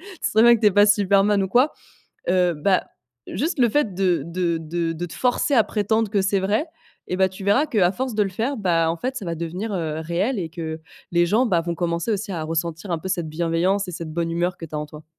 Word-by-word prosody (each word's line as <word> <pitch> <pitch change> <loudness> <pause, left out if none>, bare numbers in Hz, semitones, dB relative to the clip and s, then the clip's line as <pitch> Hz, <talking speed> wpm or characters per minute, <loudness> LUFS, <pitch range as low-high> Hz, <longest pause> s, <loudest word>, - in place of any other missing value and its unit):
tu 375 0 -13
sais - - +2
très 220 - +5
bien 235 0 +7
que - - -10
tu 215 - +3
es - - +7
pas 205 +2 +6
Superman 200 0 +3
ou 190 - -4
quoi. 255 +8 +4 0.6
Heu, 180 -1 +3
bah, 185 +5 +1 0.4
juste 320 +3 -2
le 245 -2 +4
fait 225 -7 +1
de 180 -4 +1
de 170 0 -1
de 165 +1 -2
de 170 +2 -4
te 160 - -10
forcer 250 +3 +1
à 225 -4 +5
prétendre 220 +1 0
que 205 -1 +2
c'est 195 0 +1
vrai, 205 - 0 0.4
et 180 - -1
bah, 190 0 +3
tu 190 +1 -10
verras 205 +10 +3
qu'à 200 -10 +2
force 255 +3 -3
de 210 - +2
le 200 - 0
faire, 225 +9 -2
bah, 165 -5 +2
en 165 - -2
fait, 260 +5 -3
ça 215 - -5
va 170 - -3
devenir, 175 +7 -4
heu, 160 -3 -2
réel 180 +10 -1
et 170 -4 -3
que 160 -1 -5 0.3
les 175 0 +3
gens, 220 +8 +2
bah 180 -7 +2
vont 170 0 -3
commencer 170 +4 -2
aussi 205 +1 -3
à 165 -3 -3
ressentir 165 +3 -3
un 165 - 0
peu 190 - -6
cette 175 -4 -2
bienveillance 170 +5 0
et - - -5
cette 165 -2 -6
bonne 170 0 -1
humeur 175 +2 -1
que - - -7
tu 155 - -13
as - - -1
en 150 - -3
toi. 150 +1 -12
185 Hz, 265 wpm, -23 LUFS, 170-210 Hz, 0.6 s, bien